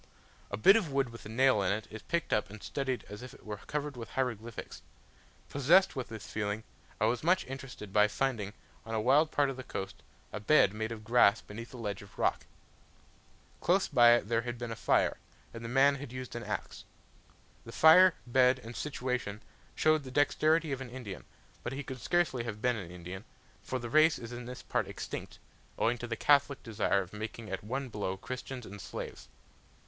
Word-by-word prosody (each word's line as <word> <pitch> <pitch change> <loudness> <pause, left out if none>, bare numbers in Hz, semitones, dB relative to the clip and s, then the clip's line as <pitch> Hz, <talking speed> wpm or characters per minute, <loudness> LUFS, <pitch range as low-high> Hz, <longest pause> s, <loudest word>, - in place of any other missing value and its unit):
A 100 - -3
bit 195 - +7
of 195 -10 +1
wood 135 -2 +1
with 115 -2 -10
a - - -10
nail 130 -1 +4
in 95 - +1
it, 105 +2 -2
is 110 0 -7
picked 170 0 -1
up 105 -4 +1
and 110 +1 -11
studied 135 -3 -2
as 105 +1 -9
if 125 0 -9
it - - -18
were 105 -1 -5
covered 150 +4 -4
with 115 -2 -7
hieroglyphics. 115 -4 -4 0.7
Possessed 170 +8 +4
with 130 -2 -3
this 110 -4 -8
feeling, 105 0 -3 0.4
I 110 - +3
was 115 +2 +1
much 180 +3 +3
interested 130 -6 -8
by 105 0 +6
finding, 105 -3 -2 0.3
on 115 0 -4
a - - +1
wild 140 +8 +4
part 145 -3 +2
of 130 - -8
the 130 - -6
coast, 95 -5 -6 0.3
a 105 - -3
bed 105 -3 +4
made 110 +1 -3
of 110 -2 -6
grass 115 -2 +5
beneath 115 +3 -9
a 130 - -9
ledge 105 -4 -4
of 100 -1 -15
rock. - - 0 1.1
Close - - +2
by 120 -1 +7
it 120 -3 +1
there 115 0 +1
had 120 0 -5
been 120 -1 -5
a - - -3
fire, - - +2 0.4
and 115 0 -8
the 115 - -5
man 135 +3 +5
had 135 -3 -8
used 130 -1 -7
an 120 - -4
axe. - - -5 0.8
The - - -10
fire, 180 +3 +7
bed, 125 +1 +4
and 115 -1 -10
situation 125 -4 -3 0.3
showed 155 -1 +3
the 135 - -9
dexterity 155 +3 +2
of 135 -1 -3
an 130 - -6
Indian; 120 -6 -8 0.4
but 120 - -4
he 140 +2 -4
could 130 -1 -7
scarcely 175 -9 +1
have 110 -3 -5
been 125 +2 +2
an 95 -6 -6
Indian, 90 +2 -8 0.4
for 130 - -3
the 120 -1 -5
race 155 +6 +5
is 115 0 -8
in 120 0 -6
this 125 +1 -8
part - - -1
extinct, - - -6 0.4
owing 120 +1 +1
to 120 - -5
the 115 - -2
Catholic 140 +1 +3
desire 105 -3 +1
of 90 - -15
making 110 0 -6
at 95 - -4
one 130 +5 -3
blow 100 -5 -3
Christians 125 +3 -6
and 100 +1 -9
Slaves. - - -7
120 Hz, 205 wpm, -31 LUFS, 105-135 Hz, 1.1 s, bit